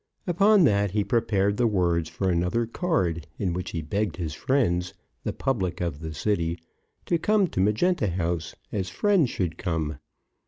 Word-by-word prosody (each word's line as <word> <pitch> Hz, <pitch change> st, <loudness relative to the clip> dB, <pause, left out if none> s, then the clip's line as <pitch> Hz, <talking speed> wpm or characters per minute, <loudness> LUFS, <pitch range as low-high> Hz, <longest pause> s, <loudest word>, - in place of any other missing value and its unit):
Upon 195 Hz, +3 st, +5 dB
that, 100 Hz, -7 st, +3 dB
he 105 Hz, +2 st, 0 dB
prepared 100 Hz, -3 st, +1 dB
the 120 Hz, -, +3 dB
words 85 Hz, -5 st, +1 dB
for 95 Hz, -, -2 dB
another 90 Hz, +7 st, +1 dB
card, 95 Hz, -, -1 dB
in 90 Hz, -4 st, -1 dB
which 90 Hz, +1 st, -4 dB
he 85 Hz, -, -4 dB
begged 100 Hz, +3 st, -1 dB
his 80 Hz, -4 st, -3 dB
friends, 90 Hz, -, 0 dB, 0.3 s
the -, -, -1 dB
public 95 Hz, -10 st, -1 dB
of 85 Hz, -4 st, -2 dB
the 80 Hz, 0 st, -5 dB
city, 85 Hz, -2 st, 0 dB, 0.5 s
to 170 Hz, -, +1 dB
come 210 Hz, +2 st, +3 dB
to -, -, -4 dB
Magenta 105 Hz, -, +2 dB
House, 85 Hz, -2 st, -2 dB, 0.2 s
as 95 Hz, -3 st, -2 dB
friends 195 Hz, -, +2 dB
should 85 Hz, -7 st, -3 dB
come. 80 Hz, -3 st, -2 dB
95 Hz, 165 wpm, -26 LUFS, 85-120 Hz, 0.5 s, Upon